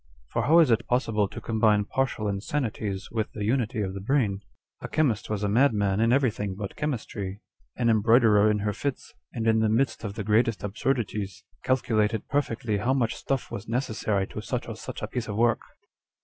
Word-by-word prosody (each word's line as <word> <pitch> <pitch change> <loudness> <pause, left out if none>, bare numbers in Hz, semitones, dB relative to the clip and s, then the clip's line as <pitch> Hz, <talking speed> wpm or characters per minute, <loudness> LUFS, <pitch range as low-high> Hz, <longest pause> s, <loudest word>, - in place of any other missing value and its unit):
For - - -1
how 160 +3 +6
is 160 -7 +6
it 115 - +1
possible 115 -5 +1
to 100 - -8
combine 110 -2 +2
partial 120 -3 -1
insanities 100 -2 -3
with 110 -2 -2
the 105 - -4
unity 120 -1 0
of 95 -1 -3
the 100 - -5
brain? 105 -3 0 0.4
A - - -5
chemist 130 -10 0
was 105 -1 -2
a - - +2
madman 105 -4 +2
in 115 +1 +3
everything 110 -7 +1
but 100 0 -6
chemistry. 105 -9 -4 0.4
An 120 - 0
embroiderer 110 -1 +5
in 105 - +2
her 105 - 0
fits, 140 +5 -4 0.2
and 115 -2 -3
in 110 -1 +4
the 110 -1 +2
midst 115 +2 +1
of 105 -2 -4
the 110 - -3
greatest 110 +1 +2
absurdities, 105 -3 -2 0.2
calcu 130 -2 0
lated 105 0 +1
perfectly 115 -6 0
how 120 +6 +1
much 120 -4 +1
stuff 135 -2 -3
was 105 - -6
necessary 110 -5 -1
to - - -6
such - - -3
or - - -5
such - - -7
a - - -1
piece 120 -3 -4
of 105 - -4
work." 120 +1 +2
110 Hz, 195 wpm, -26 LUFS, 105-125 Hz, 0.4 s, how